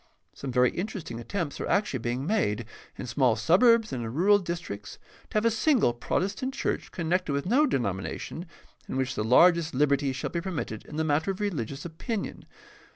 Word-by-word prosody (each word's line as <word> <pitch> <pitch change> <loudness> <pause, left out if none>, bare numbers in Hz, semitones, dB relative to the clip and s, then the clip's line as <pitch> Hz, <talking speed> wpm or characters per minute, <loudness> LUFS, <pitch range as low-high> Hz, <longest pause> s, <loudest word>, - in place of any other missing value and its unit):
Some 135 - -6
very 125 0 +4
interesting 180 - -5
attempts 160 - -4
are - - -2
actually 200 -10 +1
being 120 +4 -2
made, 120 - 0 0.3
in - - -5
small 125 -1 +2
suburbs 220 - +4
and 120 -2 -3
in 115 - -4
rural 195 - +4
districts, 170 - -6 0.3
to - - -1
have 215 - +1
a 230 - +4
single 225 - +3
Protestant 195 - -2
church - - -2
connected 175 -2 -1
with 140 0 -1
no 265 +10 +4
denomination 120 - -3 0.4
in - - -2
which 130 -1 0
the - - -2
largest 165 +6 +5
liberty 140 0 +2
shall 130 - -4
be 170 - -2
permitted 165 - -4
in 150 - -9
the 160 - 0
matter 155 +3 +1
of 190 - -2
religious 145 - -3
opinion. 195 +6 -4
160 Hz, 180 wpm, -27 LUFS, 125-195 Hz, 0.4 s, largest